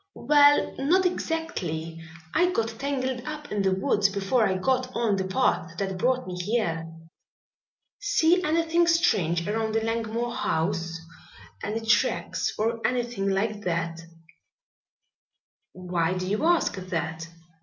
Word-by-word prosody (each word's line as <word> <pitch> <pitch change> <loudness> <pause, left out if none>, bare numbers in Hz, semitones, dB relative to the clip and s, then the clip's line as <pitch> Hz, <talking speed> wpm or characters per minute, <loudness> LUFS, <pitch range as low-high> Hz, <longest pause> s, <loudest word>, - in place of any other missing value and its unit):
"Well, 290 +2 +4
not 355 +8 +3
exactly. 175 - -3 0.3
I 355 +2 +3
got 230 -11 0
tangled 260 -3 -2
up 305 0 -7
in 205 - 0
the 190 -1 +2
woods 200 +1 +2
before 200 +4 +1
I 190 - 0
got 255 +5 0
on 230 -4 +1
the 190 -1 -2
path 170 -3 0
that 190 -1 -3
brought 255 +4 +1
me 185 - -6
here." 170 -6 -1 1.1
"See 360 -3 +3
anything 330 +2 +2
strange 180 - +2
around 220 +1 -1
the 225 - +1
Langmore 230 +1 -2
house 165 -2 -1 0.6
any 220 +2 -3
tracks 220 - +1
or 230 +2 0
anything 240 -4 -1
like 205 +2 -1
that?" 170 -1 -2 1.7
"Why 180 -1 -1
do 185 - -3
you 210 +10 -1
ask 345 -11 +2
that? 165 -3 -4
220 Hz, 130 wpm, -26 LUFS, 185-260 Hz, 1.7 s, Well